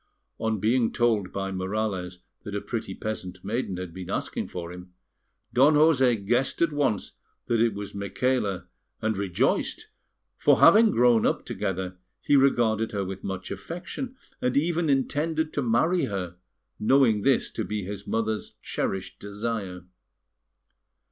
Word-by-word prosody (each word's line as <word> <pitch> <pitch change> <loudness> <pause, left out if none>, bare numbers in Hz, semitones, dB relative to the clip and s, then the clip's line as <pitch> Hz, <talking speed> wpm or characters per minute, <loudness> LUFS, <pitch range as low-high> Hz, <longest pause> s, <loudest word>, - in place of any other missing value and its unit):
On 110 -2 0
being 115 +3 +2
told 110 -6 +1
by 95 0 -3
Morales 95 -2 -3 0.2
that - - -6
a - - 0
pretty - - -4
peasant 95 -4 -5
maiden 105 -3 -2
had 90 -2 -6
been 95 -1 -8
asking - - -3
for 85 -1 -6
him, 90 0 -12 0.6
Don 140 +5 +5
José 130 -9 +4
guessed 120 +5 +1
at 160 -3 +1
once 140 -9 0 0.3
that 115 -1 +1
it 115 -3 +2
was 100 0 -6
Micaela, 100 0 -1 0.3
and 110 0 0
rejoiced; 95 -3 0 0.5
for - - +4
having 220 +2 +7
grown 120 - +4
up - - 0
together, 95 -1 -3 0.2
he 145 - +2
regarded 115 -5 +3
her 100 -2 -1
with 95 0 -6
much 95 -1 -5
affection, 190 +9 -6 0.3
and 125 +1 +1
even 165 +1 +1
intended 155 +3 0
to 145 - 0
marry 150 +9 +2
her, 90 -4 -4 0.4
knowing 115 -2 +4
this 135 +3 +2
to 110 - -3
be 105 -1 -3
his 100 +1 -7
mother's 110 -1 -2
cherished 95 -1 -3
desire. 100 -3 -4
110 Hz, 145 wpm, -26 LUFS, 95-130 Hz, 0.6 s, having